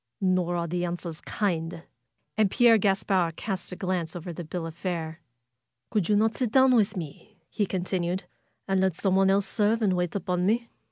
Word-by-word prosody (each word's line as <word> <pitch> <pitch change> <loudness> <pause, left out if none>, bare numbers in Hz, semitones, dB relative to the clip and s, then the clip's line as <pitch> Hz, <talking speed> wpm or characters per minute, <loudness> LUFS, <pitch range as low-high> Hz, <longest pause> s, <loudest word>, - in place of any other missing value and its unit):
''Nor 185 -2 +1
are 170 - -1
the 175 +2 -2
answers 170 -2 -4
kind 165 -5 -2 0.3
!" - - -51
And 215 -3 +3
Pierre 230 +1 +5
Gaspard 190 -4 +1
cast 190 -2 -4
a - - -5
glance 180 -3 -2
over 175 0 -6
the 175 - -6
bill 165 +1 -5
of 165 - -6
fare. 170 -2 -4 0.7
"Could 210 -5 0
you 210 - +4
not 220 +2 +2
sit 245 -4 -1
down 260 0 +5
with 215 -4 +2
me?" 180 +6 -8
he 205 - 0
continued. 180 0 -2 0.4
"And 195 -1 +2
let 190 -3 +2
someone 190 +1 +2
else 195 0 +3
serve 220 +1 +1
and 195 -3 +3
wait 180 0 -1
upon 180 -2 -1
me?" 235 +2 +1
185 Hz, 190 wpm, -27 LUFS, 175-205 Hz, 0.7 s, Pierre